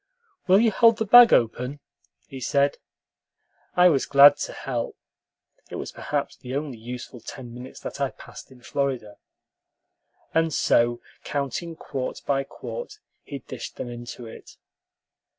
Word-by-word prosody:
"Will 190 +2 +6
you 225 0 +4
hold 230 +2 +5
the 220 - -1
bag 240 +3 +9
open?" 125 +4 +1 0.5
he 135 - -9
said. 140 +3 +1 1.0
I 180 0 +7
was 140 -5 +1
glad 145 0 +8
to - - -4
help 120 -3 -4 0.7
(it - - -7
was - - -5
perhaps - - -3
the 125 +1 -7
only 140 -5 -4
useful 125 +2 -8
ten 120 -1 -9
minutes 125 +2 -10
that - - -7
I - - +1
passed - - -13
in 130 -2 -17
Florida); 130 -8 -3 1.2
and 165 0 +2
so, 120 -4 +2 0.2
counting 145 +4 -3
quart 135 -4 -5
by 135 -1 +1
quart, 480 - -8 0.2
he 140 -4 -8
dished - - -7
them 120 - -6
into 120 0 -8
it. 110 - -12
135 Hz, 145 wpm, -25 LUFS, 125-160 Hz, 1.2 s, bag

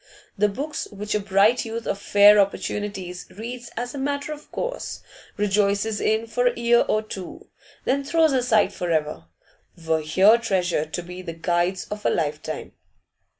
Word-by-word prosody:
The 210 0 +2
books 290 +9 -4
which 210 0 -5
a 210 - +2
bright 200 +4 +3
youth 230 0 -5
of 200 - -2
fair 205 +1 +6
opportunities 195 -2 -2
reads 240 +4 -7
as 245 +1 -3
a 280 - -5
matter 285 +2 -2
of 300 - -13
course, - - -4 0.3
rejoices 205 +1 +1
in 220 +1 +1
for 245 +2 0
a 245 - 0
year 235 0 +4
or 215 - +1
two, 190 -4 -9 0.4
then 275 +2 +1
throws 320 +2 +3
aside 245 -4 +2
for 180 -2 -4
ever, 155 - -1 0.6
were 160 -1 +2
here 190 +9 +5
treasured 180 -8 0
to 175 - -4
be 180 +1 -8
the 170 -2 -6
guides 175 +3 0
of 210 0 -5
a - - +3
lifetime. 150 -2 -3
210 Hz, 165 wpm, -24 LUFS, 185-235 Hz, 0.6 s, fair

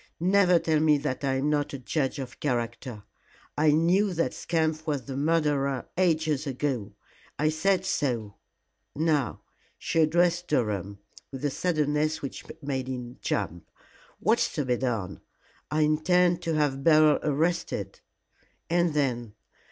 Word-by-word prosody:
"Never 180 0 +4
tell 160 -2 +1
me 155 -1 +4
that 140 -1 -3
I 135 -1 +1
am 140 +3 0
not 145 -1 0
a - - -4
judge 135 +2 -2
of 130 -3 -7
character. 120 -4 -3 0.5
I 155 +1 +3
knew 175 +6 +3
that 165 - 0
scamp 160 -1 -1
was 145 -4 -1
the 135 - -6
murderer 145 -3 +1
ages 160 -5 +1
ago. 130 -6 -2 0.4
I 155 +1 +2
said 185 +4 +1
so. 120 - -1 0.6
Now" 150 -5 0 0.4
she 165 - -1
addressed 175 +2 +2
Durham 100 -7 -1 0.3
with 135 +1 -5
a 145 - +1
suddenness 155 -2 0
which 140 - -6 0.2
made 135 -2 -2
him 125 -1 -6
jump 85 +1 -3 0.5
"what's - - +2
to 145 - -1
be 125 -1 +1
done?" 115 -7 -3 0.5
"I 155 +1 +1
intend 175 +3 +3
to 165 -2 -1
have 140 -3 0
Beryl 155 -1 +5
arrested." 165 +4 -1 0.7
"And 170 -2 +2
then?" 120 -7 -1
150 Hz, 140 wpm, -27 LUFS, 130-160 Hz, 0.7 s, Beryl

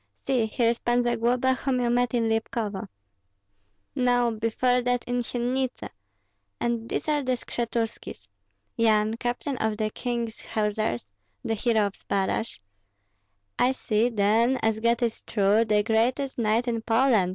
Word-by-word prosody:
See, 250 -5 +1
here 230 +1 +1
is 235 - -4
Pan 240 0 +1
Zagloba, 240 +2 +2
whom 255 0 -1
you 240 -1 +1
met 245 0 +1
in 230 -1 +1
Lipkovo 225 -2 -2 1.1
no, 245 -1 +2
before 230 +3 +1
that 245 0 0
in 245 0 -1
Syennitsy; 250 +2 -2 0.7
and 235 -1 -2
these - - -3
are 300 -1 +2
the 255 -1 0
Skshetuskis, 230 - -4 0.5
Yan, 215 -1 +3
captain 245 +3 -3
of 220 -1 0
the 215 -1 -1
king's 235 -2 -3
hussars, 210 - -1 0.4
the 225 - 0
hero 220 -1 +2
of 200 - -3
Zbaraj 200 +4 -2 0.5
" 100 0 -32
"I 255 +1 +4
see, 225 -2 +1
then, 225 +4 +2
as 220 -1 +1
God 235 +2 +1
is 230 -1 -1
true, 205 +1 +2
the 210 -1 +2
greatest 245 +5 +1
knight 230 +2 +1
in 230 -1 -1
Poland!" 225 -4 +3
230 Hz, 150 wpm, -26 LUFS, 215-245 Hz, 1.1 s, I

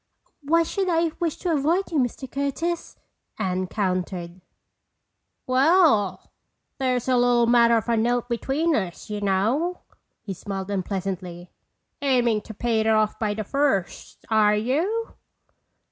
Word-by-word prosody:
"Why 330 +4 +3
should 380 +3 -2
I 330 -1 +2
wish 335 -3 -1
to 350 -3 -1
avoid 325 +7 +1
you, 315 - +1
Mr. 255 +1 -2
Curtis?" 280 +6 -3 0.4
Anne 185 0 -1
countered. 185 -2 -3 1.0
"Well, 265 - +3 0.5
there's 255 -2 0
a 255 - +3
little 245 -1 +4
matter 235 0 +5
of 225 - -3
a 235 - +2
note 240 +2 +1
between 275 +7 0
us, 190 +1 -4
y'know." 210 - 0 0.4
He 195 - -5
smiled 195 +1 -6
unpleasantly. 185 -2 -4 0.5
"Aiming 245 -6 +2
to - - -5
pay 230 +1 0
it 220 - 0
off 215 -1 +2
by 210 -2 -1
the 215 - -3
first, 275 -5 -2
are 210 -1 +4
you?" 325 - -1
235 Hz, 130 wpm, -24 LUFS, 205-285 Hz, 1.0 s, matter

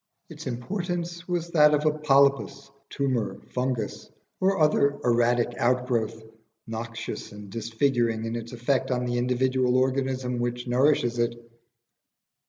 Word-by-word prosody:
Its - - -9
importance 175 - -4
was 170 -1 -2
that 150 -2 +6
of 150 +1 -1
a 155 - +5
polypus, 140 -2 +2 0.2
tumour, 120 -8 -1
fungus, 125 -4 -3 0.3
or 195 +1 +2
other 145 -2 +3
erratic 120 0 +2
outgrowth, 120 -3 0 0.4
noxious 115 0 -6
and 105 -1 -11
disfiguring 115 0 0
in 115 +1 -3
its 115 0 -6
effect 130 +2 0
on 125 -1 0
the 120 0 -1
individual 125 0 +1
organism 130 -1 0
which 120 0 -2
nourishes 125 -1 +2
it. 120 0 +1
125 Hz, 125 wpm, -26 LUFS, 120-140 Hz, 0.4 s, that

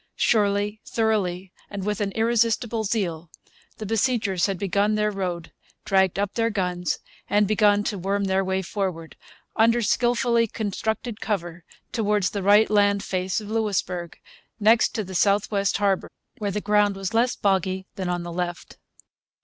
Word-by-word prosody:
Surely, 205 -1 +1
thoroughly, 195 -5 -1 0.2
and 200 -2 -5
with 210 0 -2
an 200 -1 -1
irresistible 230 0 +1
zeal, 175 -6 -2 0.5
the 215 - -6
besiegers 220 -4 +1
had 195 -2 -2
built 200 +3 +1
their 210 0 +1
road, 180 -4 -4 0.3
dragged 190 -2 +2
up 200 0 -1
their 230 -1 +1
guns, 180 -4 -1 0.3
and 205 0 +3
begun 205 -1 +3
to 205 -2 -3
worm 200 +2 -1
their 190 0 +1
way 190 0 -1
forward, 175 -4 -4 0.4
under 230 +2 +4
skilfully 240 +1 +2
constructed 220 +2 -3
cover, 175 -5 -3 0.3
towards 210 -5 +1
the 200 - -3
right 205 +3 +5
land 205 -1 +3
face 185 0 -1
of 210 -1 -8
Louisbourg, 185 -6 -2 0.4
next 220 +2 +4
to 220 - -1
the 190 0 -9
south 200 +3 +2
west 200 -1 +1
harbour, 200 -2 0 0.3
where 205 -2 -1
the 210 +1 -2
ground 205 -1 +2
was 195 +2 -4
less 240 +2 +2
boggy 190 -1 0
than 185 -2 -4
on 175 -1 -2
the 170 0 -6
left. 175 0 -5
205 Hz, 155 wpm, -24 LUFS, 190-215 Hz, 0.5 s, right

